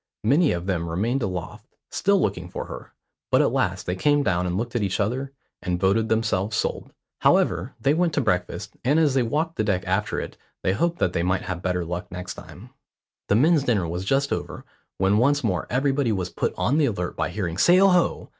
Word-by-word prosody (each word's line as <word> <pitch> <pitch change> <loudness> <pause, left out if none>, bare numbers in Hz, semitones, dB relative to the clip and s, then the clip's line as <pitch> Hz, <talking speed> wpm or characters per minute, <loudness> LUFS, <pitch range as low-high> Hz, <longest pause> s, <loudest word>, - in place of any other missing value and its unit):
Many 145 +8 +4
of 85 0 -3
them 85 -3 -1
remained 115 +11 0
aloft, 100 +2 -5 0.2
still 200 0 +2
looking 90 - -2
for - - -5
her, - - -9 0.4
but - - +4
at - - +3
last 90 0 -1
they 90 - -2
came 145 +8 +2
down 90 -5 0
and 90 +1 -1
looked 120 +3 -4
at 120 - +1
each 95 0 -1
other, 125 +7 -1 0.3
and 90 -1 -2
voted 100 +4 +2
themselves 110 -2 0
sold. - - -2 0.3
However, - - +2
they 140 - +2
went 170 +1 +1
to - - +2
breakfast, 100 -1 -2
and 140 +5 +3
as 150 -4 +3
they 130 - +3
walked 155 +7 -1
the 110 - +1
deck 95 -3 0
after - - -1
it - - -7 0.3
they 95 - +2
hoped 170 - 0
that 90 - 0
they 85 - 0
might 95 +2 0
have 90 -2 -4
better 90 -1 -1
luck 85 +1 -5
next 90 +1 -6
time. - - -12 0.6
The 100 - +3
men's 155 +6 +4
dinner 105 -10 +1
was 90 +3 -4
just 135 +7 +1
over, - - -5 0.3
when 95 +2 +3
once 140 +3 +2
more 90 -7 -1
everybody 135 -1 +1
was 95 -3 -2
put - - -2
on 145 +5 +1
the 150 - +4
alert 90 -5 -3
by 80 -1 -1
hearing 90 -2 -3
"Sail 185 +3 +6
ho!" 180 -2 +1
105 Hz, 215 wpm, -24 LUFS, 90-135 Hz, 0.6 s, Sail